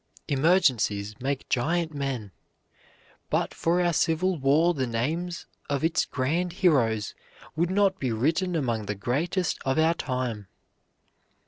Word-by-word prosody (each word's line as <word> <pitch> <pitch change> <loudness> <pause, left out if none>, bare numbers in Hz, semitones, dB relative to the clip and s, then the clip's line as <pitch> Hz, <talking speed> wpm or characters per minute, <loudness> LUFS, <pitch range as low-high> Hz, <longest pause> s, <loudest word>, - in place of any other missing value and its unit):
Emergencies 135 - +2
make 135 +1 -3
giant 160 +6 0
men. 135 -8 -3 1.0
But - - 0
for 170 +2 +1
our 175 -1 +2
Civil 175 +4 +1
War 150 +6 +3
the 130 -5 -2
names 160 +10 -2 0.2
of 140 +1 -1
its 160 0 +2
grand 165 +7 -1
heroes 120 - +2 0.4
would 170 +2 +1
not 195 0 +2
be 130 -3 -1
written 165 - 0
among 115 -8 -1
the 105 - -2
greatest 155 - -1
of 135 +2 0
our 160 +1 +4
time. 125 - -3
145 Hz, 130 wpm, -26 LUFS, 125-170 Hz, 1.0 s, our